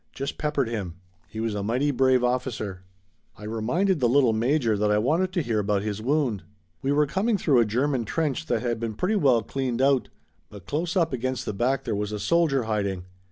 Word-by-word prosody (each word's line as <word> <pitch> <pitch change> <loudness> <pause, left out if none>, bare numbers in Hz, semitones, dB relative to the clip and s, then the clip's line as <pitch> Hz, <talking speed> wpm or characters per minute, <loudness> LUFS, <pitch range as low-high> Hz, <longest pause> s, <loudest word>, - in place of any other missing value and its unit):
Just 135 +1 -5
peppered 150 -4 0
him. 100 -7 -4 0.3
He 110 - -8
was 115 -1 -1
a 105 - -2
mighty 125 +8 0
brave 130 -1 +3
officer." 125 -6 -2 0.6
I 105 - -12
reminded 125 - 0
the 120 -3 +2
little 125 -3 +4
major 120 0 +1
that 105 +1 +1
I 105 - +3
wanted 160 +12 +1
to 175 - 0
hear 115 -4 0
about 100 -1 0
his 105 0 -3
wound. 130 -5 0 0.4
"We 135 - 0
were 150 +1 +3
coming 205 +8 0
through 145 -8 +3
a 115 - +4
German 125 +3 0
trench 155 +4 -2
that 120 -4 0
had 120 -2 -1
been 115 -2 -3
pretty 185 - 0
well 130 - +3
cleaned 125 +1 -3
out, 135 -1 +2 0.4
but 100 -4 -12
close 165 +4 -2
up 165 -5 +1
against 130 +1 -2
the - - -3
back 125 +6 0
there - - -2
was 105 0 -2
a 105 - -4
soldier 160 -2 +2
hiding. 100 -4 -2
125 Hz, 210 wpm, -25 LUFS, 110-145 Hz, 0.6 s, little